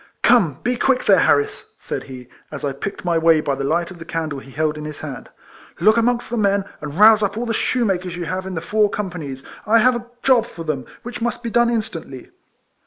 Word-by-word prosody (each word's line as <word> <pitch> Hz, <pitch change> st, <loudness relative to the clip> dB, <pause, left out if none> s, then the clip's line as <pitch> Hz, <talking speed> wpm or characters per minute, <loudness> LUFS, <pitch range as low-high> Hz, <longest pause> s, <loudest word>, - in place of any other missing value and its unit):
" -, -, -47 dB
Come, 170 Hz, -, +3 dB
be 245 Hz, 0 st, 0 dB
quick 260 Hz, +1 st, +1 dB
there, 195 Hz, -4 st, +6 dB
Harris! 145 Hz, -2 st, +1 dB
" -, -, -39 dB
said -, -, -5 dB
he, 125 Hz, -2 st, -10 dB, 0.2 s
as 145 Hz, -1 st, -5 dB
I 140 Hz, -, 0 dB
picked 180 Hz, +8 st, -6 dB
my 170 Hz, -2 st, +2 dB
way 165 Hz, -1 st, +5 dB
by 145 Hz, -2 st, -1 dB
the 135 Hz, 0 st, -3 dB
light 170 Hz, +5 st, 0 dB
of 180 Hz, -, -11 dB
the -, -, -7 dB
candle 160 Hz, -4 st, -4 dB
he 135 Hz, -, -14 dB
held 155 Hz, +2 st, -1 dB
in 150 Hz, -, -7 dB
his 150 Hz, -1 st, -7 dB
hand; 140 Hz, -5 st, -7 dB, 0.3 s
" -, -, -23 dB
look 215 Hz, +5 st, +5 dB
amongst 235 Hz, 0 st, +1 dB
the 240 Hz, -, -1 dB
men, 200 Hz, -2 st, +2 dB, 0.2 s
and 150 Hz, +1 st, -6 dB
rouse 215 Hz, +1 st, +7 dB
up 205 Hz, 0 st, -1 dB
all 240 Hz, -, -2 dB
the 230 Hz, -, -1 dB
shoemakers 190 Hz, -7 st, 0 dB
you 175 Hz, -1 st, -4 dB
have 185 Hz, +3 st, -3 dB
in 190 Hz, -, -5 dB
the 160 Hz, -, -3 dB
four 210 Hz, +4 st, +2 dB
coippanies. 160 Hz, -11 st, -5 dB, 0.2 s
I 225 Hz, +2 st, +5 dB
have 250 Hz, +2 st, +4 dB
a 240 Hz, 0 st, -6 dB, 0.2 s
job 245 Hz, -4 st, +4 dB
for 165 Hz, -, -9 dB
them, 150 Hz, -5 st, -3 dB, 0.2 s
which 245 Hz, 0 st, -7 dB
must 240 Hz, +1 st, -2 dB
be 230 Hz, -, -3 dB
done 240 Hz, 0 st, +3 dB
instantly.' 165 Hz, -, -4 dB
185 Hz, 245 wpm, -20 LUFS, 155-225 Hz, 0.3 s, rouse